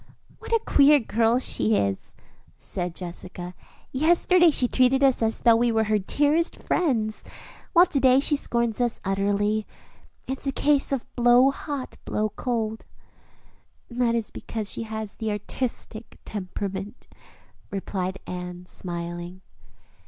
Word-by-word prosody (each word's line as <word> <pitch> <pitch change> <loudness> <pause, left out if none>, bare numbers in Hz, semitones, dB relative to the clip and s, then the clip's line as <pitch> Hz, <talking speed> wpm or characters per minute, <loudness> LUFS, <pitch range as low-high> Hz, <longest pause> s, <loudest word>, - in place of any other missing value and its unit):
"What - - -10
a 460 - +5
queer 290 +1 +6
girl 230 0 +2
she 225 -3 +1
is," 100 - -2 0.4
said 175 -2 -4
Jessica. 180 0 -6 0.4
"Yesterday 345 +4 +4
she 260 -5 +3
treated 255 +2 +3
us 265 -3 +4
as 225 0 0
though 235 -1 +6
we 235 +1 +2
were 220 -1 +2
her 215 -1 +1
dearest 295 - +1
friends, 230 -11 -1 0.5
while 350 -1 +7
to 285 - -1
day 260 0 +5
she 295 +2 +3
scorns 235 -4 -1
us 240 -2 0
utterly. 205 +2 0 0.6
It's 265 +1 -4
a - - +2
case 285 0 +1
of 270 -3 -1
'blow 245 +2 +5
hot, 280 -1 -6
blow 215 0 -1
cold.'" 220 0 -3 1.1
"That 240 -1 +1
is 225 -2 -2
because 215 -3 -5
she - - -4
has 220 -2 -5
the 220 - -3
artistic 220 +1 -5
temperament," 195 +1 -6 0.6
replied 190 -1 -3
Anne, 180 0 -7
smiling. 175 0 -6
225 Hz, 135 wpm, -25 LUFS, 200-265 Hz, 1.1 s, while